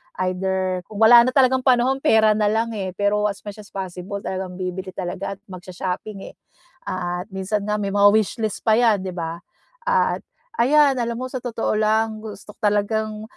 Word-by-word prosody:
Either 185 0 -1
kung 210 0 -7
wala 235 +2 +8
na - - +1
talagang 260 -1 +4
panahon, 260 +1 +3
pera 220 -7 +4
na 210 -1 +2
lang, 225 +2 0
eh. 190 -4 -4
Pero 205 +1 +1
as 205 - -5
much 205 0 -8
as 210 - -11
possible 190 +1 -5
talagang 185 -1 -4
bibili 185 0 -5
talaga 190 +2 -4
at - - -30
mag-sho-shopping, 185 +2 -6
eh. - - -30 0.5
At 180 0 -3
minsan 200 +2 -2
nga 210 - 0
may 200 -2 -2
mga 205 0 +5
wishlist 220 0 -1
pa 220 0 +4
'yan, 220 -5 +3
'di 190 - -4
ba? 170 -1 -5 0.4
At 485 0 +1 0.4
ayan 280 +3 +5
alam 235 -1 -1
mo 255 +2 -4
sa 255 - -3
totoo 235 -2 -2
lang 220 0 +1
gusto 215 -1 -10
ko - - -27
talagang 215 0 0
210 Hz, 185 wpm, -22 LUFS, 190-225 Hz, 0.5 s, wala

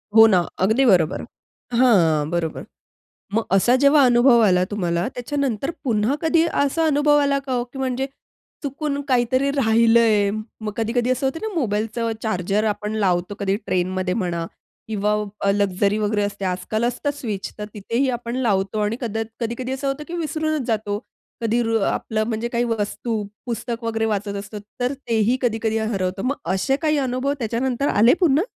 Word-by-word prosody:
हो 225 0 +10
ना, 190 -5 +4 0.3
अगदी 230 +7 +3
बरोबर 180 -7 +3 0.6
हां, 165 -12 +4
बरोबर. 170 -2 -2 0.7
मग 225 - +2
असा 215 +6 +4
जेव्हा 285 +1 +6
अनुभव 240 0 +5
आला 180 -2 +3
तुम्हाला 175 -3 -1
त्याच्यानंतर 275 +1 -2
पुन्हा 230 +1 +1
कधी 325 0 +3
असा 285 +3 +1
अनुभव 295 0 +3
आला 280 -1 +2
का 270 -1 -5
हो? 245 -1 0
की 245 +2 -11
म्हणजे, 265 0 -1 0.6
चुकून 285 0 -2
काहीतरी 255 +1 +2
राहिलंय 225 -4 +4 0.3
मग, 215 -1 -3
कधी 225 0 -1
कधी 245 0 +1
असं 255 +2 -1
होते 270 +5 -3
ना 440 -1 -4
मोबाईलचं 225 0 -1
चार्जर 200 0 0
आपण 210 0 -2
लावतो 185 -1 0
कधी 200 -1 +1
ट्रेनमध्ये 185 0 -1
म्हणा. 175 -5 -2 0.4
किंवा 210 -1 0 0.4
लक्झरी, 200 +1 +1
वगैरे 210 0 0
असते 200 -1 -3
आजकाल 185 +5 -2
असतं 265 +4 -1
स्विच. 215 -9 -5
तर 210 - -4
तिथेही 230 +6 -1
आपण 240 0 -3
लावतो 210 -4 0
आणि 210 +2 0
कदा 225 -2 -2 0.2
कधी-कधी 240 +2 -3
असं 270 +1 -3
होते, 275 +2 -2
की 335 - -10
विसरूनचं 310 -2 -1
जातो. 210 -3 -1 0.4
कधी 230 +1 +1
रु 225 0 +1
आपलं 215 -1 -1
म्हणजे 230 0 -2
काही 240 0 0
वस्तू, 225 -1 -2 0.2
पुस्तक 235 0 -4
वगैरे 225 -1 -1
वाचत 205 -2 -2
असतो. 200 +1 -8 0.2
तर 250 +2 0
तेही 230 +2 +2
कधी-कधी 225 -2 0
हरवतं. 195 -4 -2
मग 280 - 0 0.2
असे 230 +8 +1
काही 305 -2 +2
अनुभव 260 +1 0
त्याच्यानंतर 245 +4 -1
आले 235 +4 +6
पुन्हा? 320 -3 +3
230 Hz, 165 wpm, -22 LUFS, 205-260 Hz, 0.7 s, हो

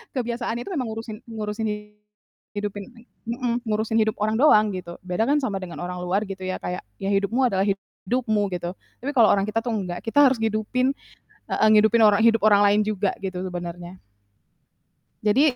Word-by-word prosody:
kebiasaannya 235 -1 -2
itu - - -5
memang 255 -5 -1
ngurusin 220 0 -6
ngurusin 215 0 -3 0.9
hidupin 205 0 -4 0.4
mhm, 240 0 -2
ngurusin 220 +1 0
hidup 220 0 +1
orang 215 +1 +1
doang 215 -8 +6
gitu. 175 -2 -7
Beda 180 +4 0
kan 295 +1 +4
sama 230 -8 -2
dengan 175 -2 -8
orang 180 0 -5
luar 190 +4 0
gitu 190 -1 -7
ya. 185 0 -3
Kayak, 180 0 -4 0.2
ya 195 - -2
hidupmu 220 +6 +2
adalah 195 -4 +1
hidupmu 210 +2 -1
gitu, 175 0 -4 0.3
tapi 280 - -1
kalau 240 -6 +5
orang 195 - +3
kita 215 +2 -1
tuh 225 - -9
nggak, 180 -4 -3
kita 230 +6 +1
harus 255 -2 +1
hidupin 225 +4 +1 0.6
heeh. - - +2
Ngehidupin 220 +2 +5
orang 205 0 +4
hidup 225 -1 +4
orang 205 -1 +6
lain 205 +1 +4
juga 205 -2 0
gitu 185 -2 -4
sebenarnya. 175 0 -7 1.3
Jadi 255 +6 +4
215 Hz, 175 wpm, -24 LUFS, 195-235 Hz, 1.3 s, doang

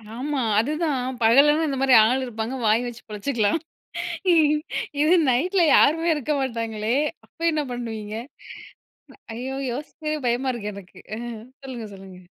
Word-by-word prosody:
ஆமா 280 +3 -2 0.2
அதுதான், 295 +1 0 0.2
பகலனா 290 +8 +5
இந்த 275 -2 -2
மாரி 270 -1 +4
ஆள் 255 +4 +2
இருப்பாங்க 230 +1 -4
வாய் 220 +3 +3
வச்சு 240 0 -8
பிழைச்சிக்கலாம். 215 +4 0 1.4
இது 310 +3 +4 0.2
நைட்ல 350 +9 +2
யாருமே 325 +3 +4
இருக்க 300 0 -1
மாட்டாங்களே 230 -3 -2 0.3
அப்போ 335 - -12
என்ன 305 -1 0
பண்ணுவீங்க? 220 -3 -5 1.2
ஐயோ 260 +3 -5 0.2
யோசிக்கவே 305 +3 -4
பயமா 250 +3 0
இருக்கு 210 -4 -5
எனக்கு. 195 -2 -12 0.2
அ - - -5 0.5
சொல்லுங்க 240 -5 -6
சொல்லுங்க. 190 -1 -12
250 Hz, 125 wpm, -24 LUFS, 225-295 Hz, 1.4 s, பகலனா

